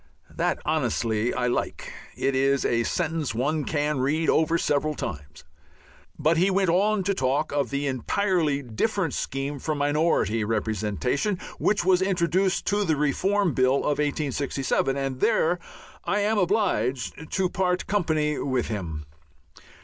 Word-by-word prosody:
That, -, -, 0 dB
honestly, 115 Hz, 0 st, 0 dB
I 125 Hz, -, -1 dB
like. 125 Hz, -, -2 dB, 0.2 s
It 135 Hz, -, 0 dB
is 135 Hz, +1 st, +2 dB
a 115 Hz, 0 st, +2 dB
sentence 160 Hz, -7 st, -1 dB
one 150 Hz, +5 st, 0 dB
can 150 Hz, -2 st, 0 dB
read 155 Hz, +5 st, +1 dB
over 160 Hz, +1 st, +2 dB
several 150 Hz, -1 st, 0 dB
times. 75 Hz, -, -7 dB, 0.7 s
But 160 Hz, +1 st, +2 dB
he 185 Hz, +4 st, +3 dB
went 190 Hz, -2 st, +2 dB
on 200 Hz, +3 st, +2 dB
to 200 Hz, +2 st, +1 dB
talk 140 Hz, -2 st, 0 dB
of 140 Hz, -4 st, 0 dB
the 140 Hz, +3 st, -2 dB
entirely 150 Hz, -, 0 dB
different 165 Hz, -, -1 dB
scheme 135 Hz, +1 st, -3 dB
for 155 Hz, +3 st, -2 dB
minority 145 Hz, -, +1 dB
representation, 110 Hz, -, -1 dB, 0.2 s
which 200 Hz, -4 st, +1 dB
was 185 Hz, -1 st, +4 dB
introduced 185 Hz, 0 st, +1 dB
into 205 Hz, 0 st, +2 dB
the 160 Hz, -5 st, +1 dB
Reform 180 Hz, +5 st, +1 dB
Bill 130 Hz, +1 st, +3 dB
of 145 Hz, +1 st, 0 dB
1867, 140 Hz, -2 st, -1 dB
and 135 Hz, -2 st, -3 dB
there 175 Hz, +6 st, +2 dB, 0.4 s
I 205 Hz, -, 0 dB
am 210 Hz, +1 st, +1 dB
obliged 155 Hz, -, 0 dB
to 190 Hz, -1 st, +2 dB
part 180 Hz, 0 st, 0 dB
company 155 Hz, -6 st, 0 dB
with 130 Hz, -3 st, -1 dB
him. 80 Hz, -8 st, -4 dB
150 Hz, 140 wpm, -25 LUFS, 130-180 Hz, 0.7 s, was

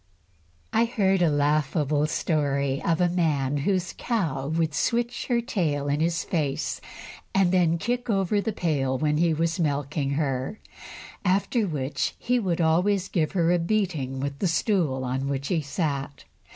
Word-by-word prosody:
I 230 Hz, -, +4 dB
heard 195 Hz, -5 st, +1 dB
a 170 Hz, -, +4 dB
laughable 150 Hz, 0 st, +1 dB
story 140 Hz, -4 st, 0 dB
of 165 Hz, -1 st, +1 dB
a 180 Hz, -, +4 dB
man 150 Hz, -6 st, +1 dB
whose 185 Hz, +5 st, 0 dB
cow 165 Hz, -, -1 dB
would 160 Hz, 0 st, 0 dB
switch 235 Hz, +8 st, -1 dB
her 240 Hz, -2 st, +2 dB
tail 155 Hz, -, -1 dB
in 145 Hz, +1 st, +1 dB
his 165 Hz, +1 st, 0 dB
face, 150 Hz, -6 st, -2 dB, 0.5 s
and 190 Hz, -2 st, +4 dB
then 170 Hz, -3 st, +3 dB
kick 245 Hz, +7 st, -2 dB
over 200 Hz, 0 st, +1 dB
the 225 Hz, -, -2 dB
pail 140 Hz, -8 st, 0 dB
when 150 Hz, +1 st, +1 dB
he 170 Hz, +1 st, +3 dB
was 165 Hz, +2 st, 0 dB
milking 145 Hz, -2 st, -1 dB
her, 135 Hz, +5 st, -2 dB, 0.6 s
after 200 Hz, +3 st, +1 dB
which 145 Hz, -4 st, -2 dB
he 245 Hz, +1 st, +1 dB
would 180 Hz, -6 st, 0 dB
always 180 Hz, +4 st, +2 dB
give 160 Hz, -3 st, 0 dB
her 170 Hz, -3 st, +2 dB
a 175 Hz, -, +3 dB
beating 165 Hz, -9 st, -1 dB
with 140 Hz, +1 st, -4 dB
the 195 Hz, -, +1 dB
stool 165 Hz, -, +1 dB
on 130 Hz, +2 st, -2 dB
which 140 Hz, -1 st, -2 dB
he 170 Hz, -4 st, +1 dB
sat. 140 Hz, -2 st, -3 dB
160 Hz, 160 wpm, -26 LUFS, 140-190 Hz, 0.6 s, I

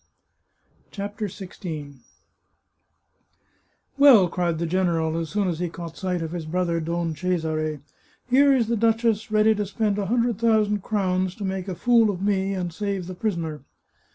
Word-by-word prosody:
CHAPTER 205 Hz, +1 st, -4 dB
XVI 165 Hz, -7 st, -8 dB, 0.9 s
" -, -, -44 dB
Well," 240 Hz, -11 st, +7 dB
cried 175 Hz, -2 st, -1 dB
the 170 Hz, -, -2 dB
general, 165 Hz, -2 st, 0 dB
as 165 Hz, -1 st, -3 dB
soon 205 Hz, +1 st, 0 dB
as 170 Hz, -3 st, -2 dB
he 175 Hz, -1 st, -1 dB
caught 170 Hz, -1 st, -8 dB
sight 180 Hz, -3 st, -2 dB
of 160 Hz, -, -5 dB
his 170 Hz, -3 st, -5 dB
brother 170 Hz, 0 st, 0 dB
Don 165 Hz, 0 st, -2 dB
Cesare, 155 Hz, -3 st, -2 dB, 0.2 s
" -, -, -36 dB
here 280 Hz, +2 st, +6 dB
is 255 Hz, -4 st, +3 dB
the 235 Hz, -, +1 dB
duchess 225 Hz, -1 st, +1 dB
ready 215 Hz, +1 st, +4 dB
to 210 Hz, -1 st, -2 dB
spend 205 Hz, 0 st, -1 dB
a 200 Hz, -, -2 dB
hundred 235 Hz, 0 st, +1 dB
thousand 215 Hz, -3 st, +2 dB
crowns 185 Hz, -2 st, -1 dB
to 205 Hz, -, -5 dB
make 190 Hz, 0 st, -3 dB
a 185 Hz, -, -4 dB
fool 230 Hz, +2 st, +4 dB
of 190 Hz, -2 st, -3 dB
me 195 Hz, -1 st, 0 dB
and 175 Hz, -2 st, -3 dB
save 200 Hz, -1 st, -3 dB
the 185 Hz, -, -6 dB
prisoner." 170 Hz, -6 st, -3 dB
190 Hz, 170 wpm, -24 LUFS, 170-215 Hz, 0.9 s, Well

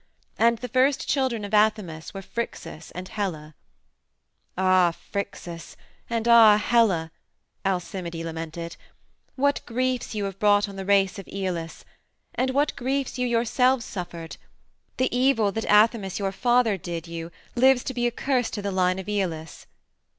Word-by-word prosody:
And 235 Hz, 0 st, +4 dB
the 250 Hz, -, -6 dB
first 260 Hz, +3 st, +2 dB
children 255 Hz, -6 st, 0 dB
of 205 Hz, -, -9 dB
Athamas 210 Hz, -7 st, +1 dB
were 195 Hz, -1 st, -8 dB
Phrixus 190 Hz, -7 st, -6 dB
and 180 Hz, +1 st, -6 dB
Helle. 165 Hz, -7 st, -4 dB, 1.0 s
"Ah, 185 Hz, -2 st, +4 dB, 0.2 s
Phrixus 180 Hz, -4 st, -5 dB, 0.3 s
and 230 Hz, -1 st, -1 dB
ah, 225 Hz, -3 st, +8 dB
Helle," 205 Hz, -8 st, +2 dB, 0.5 s
Alcimide 180 Hz, -2 st, -3 dB
lamented, 165 Hz, +1 st, -6 dB, 0.6 s
"what 285 Hz, +1 st, +1 dB
griefs 255 Hz, -1 st, -1 dB
you 210 Hz, -, -1 dB
have 195 Hz, -1 st, -6 dB
brought 205 Hz, 0 st, +4 dB
on 200 Hz, -, -9 dB
the 195 Hz, -1 st, -6 dB
race 200 Hz, 0 st, +3 dB
of 195 Hz, -, -10 dB
Aeolus! 180 Hz, -4 st, -4 dB, 0.5 s
And 260 Hz, -, 0 dB
what 285 Hz, +3 st, +1 dB
griefs 265 Hz, 0 st, -2 dB
you 250 Hz, -, +1 dB
yourselves 240 Hz, +1 st, +2 dB
suffered! 170 Hz, -3 st, -7 dB, 0.6 s
The 255 Hz, -1 st, 0 dB
evil 245 Hz, -5 st, +3 dB
that 225 Hz, +2 st, -3 dB
Athamas, 210 Hz, -2 st, +4 dB
your 195 Hz, -2 st, -1 dB
father, 240 Hz, 0 st, +2 dB
did 170 Hz, -1 st, -6 dB
you 165 Hz, 0 st, -6 dB, 0.2 s
lives 260 Hz, 0 st, +4 dB
to 260 Hz, -, -4 dB
be 240 Hz, -1 st, 0 dB
a -, -, -1 dB
curse 250 Hz, 0 st, 0 dB
to 205 Hz, -, -5 dB
the 200 Hz, -, -2 dB
line 185 Hz, -1 st, +1 dB
of 190 Hz, 0 st, -7 dB
Aeolus! 175 Hz, -6 st, -3 dB
205 Hz, 150 wpm, -25 LUFS, 180-240 Hz, 1.0 s, ah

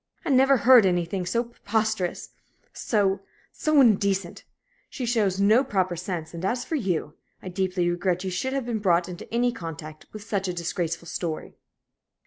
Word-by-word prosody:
I 315 Hz, -, 0 dB
never 270 Hz, +1 st, +5 dB
heard 245 Hz, -4 st, +7 dB
anything 175 Hz, +1 st, -1 dB
so 235 Hz, +5 st, +1 dB
preposterous 220 Hz, -5 st, -2 dB, 0.4 s
so 200 Hz, -3 st, +1 dB, 0.3 s
so 310 Hz, -2 st, +2 dB
indecent! 200 Hz, -7 st, +2 dB, 0.4 s
She 255 Hz, -, -5 dB
shows 210 Hz, -5 st, +1 dB
no 215 Hz, +6 st, +5 dB
proper 190 Hz, -8 st, 0 dB
sense, 170 Hz, -2 st, -5 dB
and, 170 Hz, +1 st, -7 dB
as 240 Hz, +6 st, -1 dB
for -, -, -6 dB
you, 185 Hz, -, -1 dB, 0.3 s
I 185 Hz, -, -5 dB
deeply 185 Hz, -1 st, -1 dB
regret 175 Hz, +1 st, 0 dB
you 190 Hz, -, -3 dB
should 260 Hz, +9 st, -2 dB
have 275 Hz, -3 st, -2 dB
been 235 Hz, -2 st, -2 dB
brought 175 Hz, -3 st, +2 dB
into 180 Hz, -1 st, -9 dB
any 240 Hz, +1 st, +2 dB
contact 160 Hz, -7 st, -8 dB
with 215 Hz, -1 st, -9 dB
such 200 Hz, -3 st, -2 dB
a 180 Hz, -, -2 dB
disgraceful 170 Hz, 0 st, -3 dB
story." 165 Hz, -2 st, -4 dB
195 Hz, 165 wpm, -25 LUFS, 175-230 Hz, 0.4 s, heard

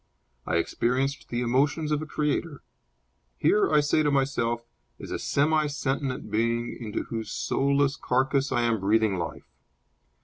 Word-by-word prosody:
I -, -, 0 dB
experience 125 Hz, +10 st, 0 dB
the 120 Hz, 0 st, -3 dB
emotions 145 Hz, +6 st, +1 dB
of 150 Hz, 0 st, +1 dB
a 155 Hz, -, -6 dB
creator. 150 Hz, 0 st, -2 dB, 0.7 s
Here, 210 Hz, -, +3 dB
I 150 Hz, -1 st, +5 dB
say 145 Hz, +1 st, +2 dB
to 150 Hz, -, +2 dB
myself, 120 Hz, -4 st, 0 dB, 0.3 s
is -, -, -9 dB
a -, -, -2 dB
semi 155 Hz, +2 st, +2 dB
sentient 135 Hz, -5 st, -3 dB
being 115 Hz, +2 st, 0 dB
into 105 Hz, -2 st, -3 dB
whose 115 Hz, -1 st, -5 dB
soulless 140 Hz, 0 st, +1 dB
carcass 135 Hz, +2 st, +1 dB
I 120 Hz, -, +2 dB
am 115 Hz, -2 st, +1 dB
breathing 105 Hz, -1 st, +2 dB
life. 80 Hz, -3 st, -5 dB
135 Hz, 145 wpm, -27 LUFS, 115-145 Hz, 0.7 s, I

